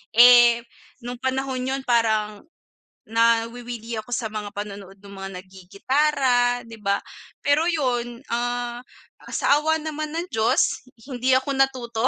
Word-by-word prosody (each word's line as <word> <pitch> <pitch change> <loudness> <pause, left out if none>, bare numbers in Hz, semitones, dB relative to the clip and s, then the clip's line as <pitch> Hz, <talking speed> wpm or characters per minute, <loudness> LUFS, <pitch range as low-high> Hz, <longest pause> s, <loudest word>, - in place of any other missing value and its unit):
Eh, 240 0 +7 0.4
nung 245 0 -6
panahon 260 0 -2
'yon 265 +1 -2
parang 220 -3 +1 0.7
nawiwili 230 0 0
ako 215 - -10
sa 245 -3 -2
mga 210 -1 -5
panonood 200 -2 -7
nong 200 0 -12
mga 195 - -5
nagigitara, 245 +6 0
di 230 - -11
ba? 200 0 +1 0.5
Pero 290 +3 +3
'yon, 245 -6 -2
ah 240 0 -2 0.4
ah - - -12
sa 285 - +3
awa 315 +1 +1
naman 310 0 -4
ng 335 +1 -2
Diyos, 220 +3 +1
hi 255 +2 -13
hindi 255 +2 +2
ako 265 +2 -3
natuto. 255 -3 +1
240 Hz, 140 wpm, -23 LUFS, 225-260 Hz, 0.7 s, Eh